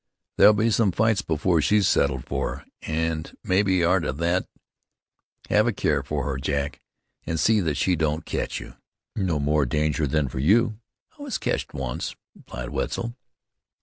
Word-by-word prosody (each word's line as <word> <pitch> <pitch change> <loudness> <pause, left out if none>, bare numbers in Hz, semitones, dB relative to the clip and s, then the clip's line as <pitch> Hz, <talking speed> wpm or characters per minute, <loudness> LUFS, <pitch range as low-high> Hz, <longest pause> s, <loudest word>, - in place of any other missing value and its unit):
"There'll 105 - +8
be 110 +2 +2
some 105 -2 +3
fights 110 +1 +2
before 80 0 +1
she's 105 +7 +3
settled 65 -3 +1
for, - - -3 0.2
an' 80 0 -1 0.2
mebbe 95 -1 +2
arter 90 -5 +2
thet. 85 +6 0 1.0
Have 105 +2 +4
a - - +3
care - - +1
for - - -3
her, 70 -2 -2
Jack, 70 +2 -2 0.5
an' 80 - -1
see 110 +7 +3
that 80 -7 -1
she 90 +3 +2
don't 80 0 -1
ketch - - -3
you." - - -10 0.4
"No 90 -6 0
more 75 -1 +2
danger 75 +2 0
than 75 0 +1
for 65 - -5
you." 105 - +3 0.4
"I - - -11
was 285 -2 -3
ketched - - -2
onct," 65 -3 -4 0.2
replied 60 0 -8
Wetzel. 120 0 -2
80 Hz, 160 wpm, -25 LUFS, 75-100 Hz, 1.0 s, There'll